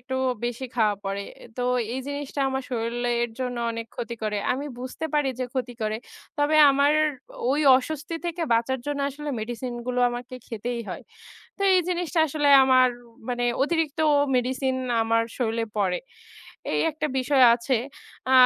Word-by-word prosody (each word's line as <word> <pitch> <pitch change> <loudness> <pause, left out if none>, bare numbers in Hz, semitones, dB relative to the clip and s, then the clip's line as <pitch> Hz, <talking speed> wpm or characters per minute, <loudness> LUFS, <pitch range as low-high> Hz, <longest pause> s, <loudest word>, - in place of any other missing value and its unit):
একটু 260 +2 -4 0.3
বেশি 240 +2 -3
খাওয়া 215 -3 +3
পড়ে। 195 +1 -2 0.3
তো 250 - -2 0.3
এই 260 - -2
জিনিসটা 285 0 -4
আমার 265 0 -2
শরীলের 240 0 -1
জন্য 250 -1 -2
অনেক 230 0 -5
ক্ষতি 235 -1 -4
করে। 210 -1 -1 0.2
আমি 275 +3 -3
বুঝতে 255 +5 -6
পারি 295 -2 +2
যে 255 - -1
ক্ষতি 250 -2 -2
করে 215 0 0 0.4
তবে 290 +2 +3
আমার 280 +2 +3 0.6
ওই 290 +3 +2 0.2
অস্বস্তি 305 +4 -4
থেকে 340 0 -3
বাঁচার 235 +3 +1
জন্য 290 -1 -2
আসলে 295 +2 -6
মেডিসিনগুলো 240 +2 -3
আমাকে 245 +1 -6
খেতেই 235 +1 -4
হয়। 180 - -6 0.5
তো - - -28
এই 365 - +5
জিনিসটা 355 -1 -1
আসলে 295 -1 0 0.2
আমার 255 -1 +5 0.4
মানে 245 -1 -1 0.2
অতিরিক্ত 320 0 0 0.4
মেডিসিন 260 +1 0 0.3
আমার 230 0 +2 0.2
শরীলে 230 -2 0
পড়ে। 185 -3 +1 0.7
এই - - +1
একটা 305 0 -3
বিষয় 265 +1 +3
আছে 240 +3 -1 0.6
আ - - +3
255 Hz, 155 wpm, -25 LUFS, 235-285 Hz, 0.7 s, এই